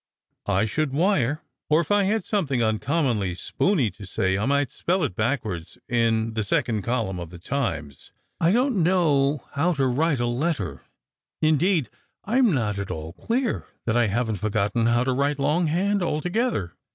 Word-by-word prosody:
I 100 +1 +2
should 140 +5 -1
wire: 155 - +1 0.3
or 155 +1 +5
if 170 +1 -2
I 205 -1 +4
had 215 +3 +1
something 140 - 0
uncommonly 110 - 0
spooney 140 - 0
to 100 - -11
say, 95 0 0
I 105 +5 -1
might 140 -2 +1
spell 180 +1 0
it 90 - -2
backwards 110 - -2
in 115 -1 +1
the 110 - -1
second 105 +2 0
column 110 -5 -2
of 85 -2 -6
the 90 - -10
Times. 85 - -4 0.3
I 165 - +3
don't 245 -2 +2
know 150 -6 +2
how 165 +5 +1
to 135 -3 +1
write 140 +3 +1
a 120 - +1
letter: 120 - -2 0.6
indeed, 155 - +2 0.3
I'm 240 +1 +3
not 105 - 0
at 100 - -4
all 80 +1 -5
clear 235 - -2 0.2
that 115 -1 0
I 120 -2 +3
haven't 110 +1 -1
forgotten 110 +3 0
how 120 +1 +3
to 130 0 0
write 140 +2 0
long 150 +5 +1
hand 195 +5 +1
alto 170 0 -1
gether. 180 - -1
135 Hz, 175 wpm, -24 LUFS, 110-165 Hz, 0.6 s, or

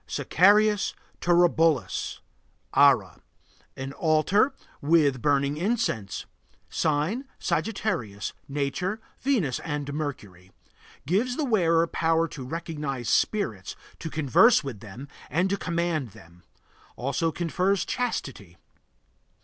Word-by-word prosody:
SACRARIUS 210 +3 +3 0.2
TURUBULUS 165 -4 +2 0.5
(ARA). - - +4 0.6
An 135 +1 -5
altar 175 - +2 0.3
with 145 -4 +3
burning 140 +1 +1
incense. 175 - -1 0.5
Sign: 160 - 0
Sagittarius. 165 - -2
Nature: 150 +9 -2 0.2
Venus 215 - 0
and 145 -3 -4
Mercury. 100 - -6 0.5
Gives 220 - 0
the 305 - 0
wearer 170 -9 +3
power 165 0 +1
to 135 - -8
recognize 145 -5 -4
spirits, 110 - 0 0.2
to 165 - -5
converse 160 - +4
with 130 -7 -6
them, 110 +7 -10 0.2
and 180 +6 +1
to - - +2
command 170 - -2
them; 90 -5 -17 0.5
also 150 +6 -1
confers 180 +4 0
chastity. 135 - -4
160 Hz, 100 wpm, -26 LUFS, 135-185 Hz, 0.6 s, ARA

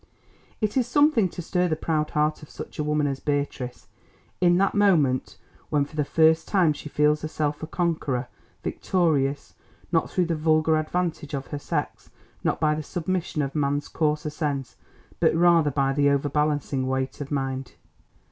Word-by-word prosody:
It 215 +3 0
is 250 -2 +2
something 270 -7 +3
to 175 - -7
stir 180 +2 +1
the 160 - 0
proud 155 -1 -1
heart 150 0 0
of 150 - -12
such - - -9
a - - +1
woman 150 0 +1
as 135 -1 -2
Beatrice, 140 -4 -3 0.5
in 175 -1 +4
that 195 +1 +2
moment 165 -11 +2 0.3
when 145 -2 +2
for 150 - -14
the 150 - +1
first 160 +2 +3
time 180 -6 +3
she 150 - -9
feels 150 +1 +2
herself 150 -1 -2
a 155 - -4
conqueror, 155 -8 -1 0.4
victorious, 145 -6 0 0.4
not 165 -2 +1
through 180 - +1
the 170 -1 -1
vulgar 155 0 +3
advantage 155 -2 -2
of 135 -1 -4
her 145 - -2
sex, - - -4 0.3
not - - 0
by 155 -1 +3
the 155 - -2
submission 170 -1 -2
of 135 0 -4
man's 145 -1 0
coarser 150 0 -1
sense, 140 -6 -3 0.4
but - - +3
rather 170 -2 +5
by 135 -1 +1
the 145 0 +3
overbalancing 145 -1 0
weight 130 +2 -2
of 140 - -5
mind. 135 -2 -3
150 Hz, 170 wpm, -25 LUFS, 140-165 Hz, 0.5 s, rather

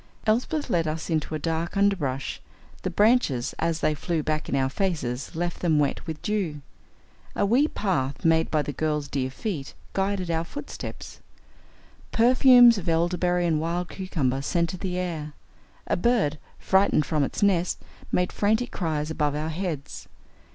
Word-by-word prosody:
Elsbeth 250 +8 +1
led 170 -9 +1
us 160 +2 -3
into 155 0 -1
a 155 - -4
dark 165 +3 -2
underbrush. 160 -10 0 0.4
The - - -2
branches, 205 - +2
as 165 0 0
they 155 - +2
flew 160 +1 -2
back 155 0 -2
in - - 0
our 135 -1 +2
faces, 140 -6 -2
left 175 +1 -2
them 165 -4 +2
wet 145 +2 0
with 160 -1 -4
dew. 185 -9 -2 0.7
A - - +2
wee 250 +9 +4
path, 145 - -2
made 160 0 +3
by 155 -2 +1
the 145 - -4
girl's 150 -1 -1
dear 135 -2 -2
feet, 140 0 -5 0.2
guided 195 -2 -1
our 165 0 0
footsteps. 290 +12 -8 0.9
Perfumes 245 -1 +7
of 175 -2 -4
elderberry 175 +1 +1
and 160 -3 +1
wild 170 +2 -2
cucumber 140 -9 -1
scented 170 +5 -1
the 185 -2 -3
air. 160 -5 -3 0.5
A - - 0
bird, 175 -8 +1 0.2
frightened 190 -6 +3
from 155 -3 +1
its 140 - -2
nest, 180 -3 +2 0.3
made 180 0 +1
frantic 220 +4 +1
cries 155 -3 -2
above 150 -2 0
our 155 +2 -2
heads. 160 -4 -5
165 Hz, 160 wpm, -26 LUFS, 150-195 Hz, 0.9 s, Perfumes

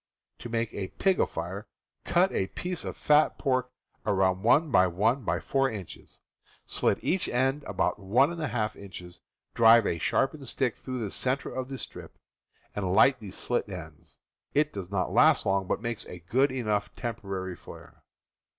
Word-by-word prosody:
To 120 - -7
make 115 -1 -2
a 95 -2 -3
"pig 190 - +1
afire," 95 +6 -2 0.4
cut 180 +2 +3
a 95 - 0
piece 180 - -4
of - - -5
fat 150 +1 +3
pork 130 -3 0 0.3
about 95 -3 +1
1x1x4 115 - +2
inches, 95 -5 -10 0.4
slit - - +1
each 185 +1 0
end 135 +4 +1
about - - -1
1^ 120 - +1
inches, 90 -3 -11 0.3
drive 115 -1 +6
a 85 - -1
sharpened 135 - 0
stick 130 -4 -1
through 130 -2 -5
the 100 - -5
center 130 +2 -2
of 130 0 -4
the 135 - -5
strip, - - -9 0.6
and 95 -3 -1
light 130 +6 +5
the 105 - -8
slit 115 +3 -1
ends. 80 -5 -10 0.4
It 150 +1 +2
does 95 -3 -6
not 95 -3 -1
last - - +5
long, 95 -1 +1
but 110 - -2
makes 115 -2 -4
a 90 - -8
good 120 - +1
enough 110 -5 -2
temporary 100 -6 -4
flare. - - -13
115 Hz, 150 wpm, -28 LUFS, 95-135 Hz, 0.6 s, drive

